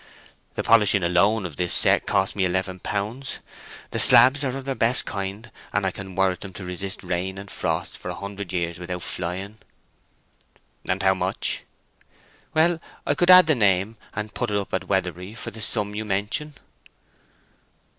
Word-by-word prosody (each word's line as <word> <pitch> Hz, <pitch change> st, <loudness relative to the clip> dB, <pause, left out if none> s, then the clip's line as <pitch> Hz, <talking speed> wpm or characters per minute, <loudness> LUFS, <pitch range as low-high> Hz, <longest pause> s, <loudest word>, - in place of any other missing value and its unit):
The -, -, -2 dB
polishing 105 Hz, -4 st, +4 dB
alone 95 Hz, +5 st, +2 dB
of 80 Hz, -5 st, -7 dB
the 90 Hz, -1 st, -1 dB
set -, -, +3 dB
cost 95 Hz, 0 st, +1 dB
me 100 Hz, -, 0 dB
eleven 95 Hz, 0 st, -1 dB
pounds—the 110 Hz, +9 st, -6 dB
slabs 140 Hz, +3 st, +7 dB
are 135 Hz, -, 0 dB
the 135 Hz, 0 st, -3 dB
best 125 Hz, 0 st, +4 dB
of -, -, -14 dB
their -, -, -6 dB
kind, 100 Hz, +4 st, -5 dB, 0.2 s
and 100 Hz, -1 st, 0 dB
I 95 Hz, -, +1 dB
can 95 Hz, 0 st, -9 dB
warrant 95 Hz, -1 st, +1 dB
them 95 Hz, -2 st, -9 dB
to 95 Hz, -, -8 dB
resist 90 Hz, +2 st, -5 dB
rain 90 Hz, +1 st, -3 dB
and 100 Hz, 0 st, -9 dB
frost 85 Hz, -1 st, -3 dB
for -, -, -7 dB
a -, -, -4 dB
hundred 100 Hz, -2 st, -7 dB
years 85 Hz, -2 st, -2 dB
without 90 Hz, 0 st, -5 dB
flying." 95 Hz, +6 st, -4 dB, 1.3 s
"And 95 Hz, +1 st, 0 dB
how 95 Hz, 0 st, +5 dB
much?" 95 Hz, -, 0 dB, 0.9 s
"Well, 165 Hz, +1 st, +3 dB, 0.2 s
I -, -, +2 dB
could 175 Hz, +5 st, +1 dB
add 185 Hz, 0 st, +10 dB
the 155 Hz, -, +3 dB
name, 100 Hz, -3 st, +2 dB, 0.2 s
and 105 Hz, +1 st, -5 dB
put 120 Hz, -2 st, -2 dB
it 105 Hz, -, 0 dB
up 100 Hz, -, -5 dB
at 95 Hz, -, -2 dB
Weatherbury 90 Hz, +1 st, -2 dB
for -, -, -7 dB
the 110 Hz, -, -9 dB
sum 105 Hz, -2 st, +1 dB
you 110 Hz, +1 st, -3 dB
mention." 105 Hz, +9 st, -2 dB
100 Hz, 175 wpm, -24 LUFS, 90-110 Hz, 1.3 s, add